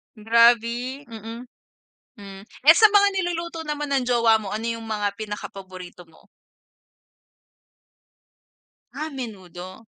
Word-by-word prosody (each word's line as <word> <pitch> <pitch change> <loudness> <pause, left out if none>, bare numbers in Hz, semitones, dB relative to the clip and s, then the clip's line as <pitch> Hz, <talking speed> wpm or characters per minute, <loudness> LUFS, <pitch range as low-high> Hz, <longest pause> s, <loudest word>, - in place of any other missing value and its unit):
Grabi, 235 +4 +2
mm, 225 +1 -8 0.8
hmm 195 -2 -11
eh, 310 +5 +5
sa 440 - +9
mga 410 -1 +5
niluluto 340 -2 -3
naman 295 -1 -4
ng 265 -3 0
jowa 230 -2 +4
mo, 210 -2 -7
ano 215 - -4 0.2
yung 225 - -10
mga 210 -2 -1
pinaka 210 -1 -6
paborito 185 -2 -11
mo? 160 - -23 2.7
Ah, 310 +1 -4
menudo. 190 - -9
230 Hz, 115 wpm, -23 LUFS, 205-280 Hz, 2.7 s, sa